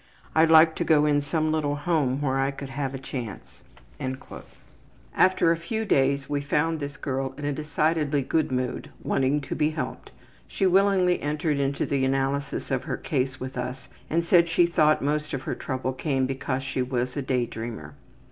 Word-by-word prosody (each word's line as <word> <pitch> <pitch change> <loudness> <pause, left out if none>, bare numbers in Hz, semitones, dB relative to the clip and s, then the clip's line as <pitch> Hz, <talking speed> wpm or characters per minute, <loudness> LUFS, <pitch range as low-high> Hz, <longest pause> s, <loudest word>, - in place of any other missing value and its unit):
I'd 160 0 +4
like 160 0 +7
to - - 0
go 150 -2 +4
in 145 -1 +3
some 155 +2 0
little 150 -2 0
home 145 -3 0
where 135 -1 +1
I 135 0 +2
could 140 0 -7
have 135 0 -3
a - - -3
chance.'' 125 -5 -7 1.5
After 185 -3 +4
a 165 - +1
few 220 +7 -3
days 140 -5 +2
we 145 -1 -1
found 150 +3 0
this 145 0 -5
girl 135 -1 -3
in 145 - -5
a 145 - 0
decidedly 150 -1 0
good 155 +2 0
mood, 125 -1 -2
wanting 135 +2 +1
to 140 - -5
be 150 0 +1
helped. 155 0 -5 0.4
She 195 - -1
willingly 190 -1 +3
entered 150 0 -1
into 140 0 0
the 140 -1 0
analysis 135 +1 -1
of - - -1
her - - -2
case 130 +1 -2
with 130 +1 -6
us 125 +1 -5 0.2
and 170 +2 +1
said 170 -1 +5
she 170 +1 +4
thought 155 -4 +3
most 150 +1 -1
of 135 - -5
her - - -2
trouble 130 -1 -3
came 135 -1 0
because 135 0 -2
she 135 -1 -2
was 125 0 -2
a 145 - -1
day 130 -2 0
dreamer. 110 -10 -7
145 Hz, 185 wpm, -26 LUFS, 135-155 Hz, 1.5 s, like